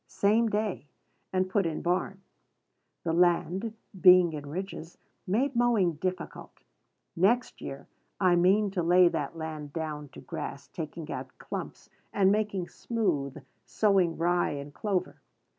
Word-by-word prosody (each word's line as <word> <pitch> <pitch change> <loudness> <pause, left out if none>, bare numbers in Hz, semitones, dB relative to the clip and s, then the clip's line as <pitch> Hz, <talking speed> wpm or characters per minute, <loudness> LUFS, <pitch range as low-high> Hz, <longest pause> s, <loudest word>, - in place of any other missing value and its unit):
same 220 +3 +2
day, 210 -7 -2 0.4
and 185 0 +1
put 195 +1 +1
in 165 -3 -2
barn. 185 +2 -1 0.8
The 165 - -1
land, 180 +5 +2 0.3
being 180 -3 +7
in 145 -1 -6
ridges, 175 0 -6 0.3
made 250 +8 +1
mowing 235 -8 +3
difficult. 185 +3 -5 0.5
Next 230 +8 +2
year 135 - -7 0.3
I 185 -2 +4
mean 195 +4 +3
to 185 -2 -1
lay 175 +1 +5
that 150 0 -3
land 155 -2 -6
down 150 -3 -4
to - - -10
grass, - - -6
taking - - -7
out - - -4
stumps, - - -6 0.2
and 195 -1 +4
making 205 -4 0
smooth, 150 - -2 0.2
sowing 190 -6 +2
rye 175 0 +1
and 145 0 -7
clover. 190 -2 -2
180 Hz, 135 wpm, -29 LUFS, 165-200 Hz, 0.8 s, being